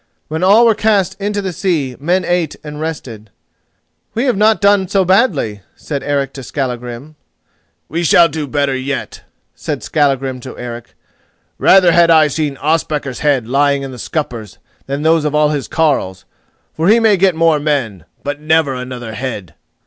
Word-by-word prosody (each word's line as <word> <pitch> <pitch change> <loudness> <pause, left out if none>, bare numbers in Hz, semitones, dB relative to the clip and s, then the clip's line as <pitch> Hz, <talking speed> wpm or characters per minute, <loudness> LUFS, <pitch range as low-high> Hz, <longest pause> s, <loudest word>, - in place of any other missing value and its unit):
When 160 +2 -3
all 210 +5 +6
were 230 - +5
cast 200 -4 +1
into 205 0 -2
the 190 -2 -3
sea, 160 -10 -1
men 175 +6 0
ate 175 -2 -1
and 150 0 -8
rested. 125 -9 -6 0.9
"We 235 - 0
have 255 -4 +1
not 215 +2 +3
done 200 -1 +3
so 190 +1 +1
badly," 175 - +1
said 140 -3 -5
Eric 140 -2 -2
to 135 - -8
Skallagrim. 125 +2 -5 0.7
"We 170 +2 -3
shall 170 +1 +5
do 155 -1 -5
better 140 0 0
yet," 130 +2 -4 0.3
said - - -5
Skallagrim 135 -3 0
to 130 +1 -10
Eric; 120 -1 -8 0.6
"rather 185 -2 +5
had 170 0 +4
I 155 -2 +5
seen 145 -1 -2
Ospakar's 150 -3 -1
head 140 -6 +1
lying 140 +2 +1
in 135 - -6
the 125 - -10
scuppers 120 - -5 0.3
than 140 +2 -3
those 160 0 +3
of 150 -1 -1
all 150 0 +3
his 145 -3 -3
carles; 135 - -1 0.5
for 160 +2 -1
he 220 +3 +5
may 220 -2 +4
get 185 -2 +2
more 165 -2 +3
men, 125 - -2 0.2
but 145 0 -4
never 155 -2 +2
another 125 -3 -6
head!" 110 -9 -5
150 Hz, 170 wpm, -16 LUFS, 130-170 Hz, 0.9 s, all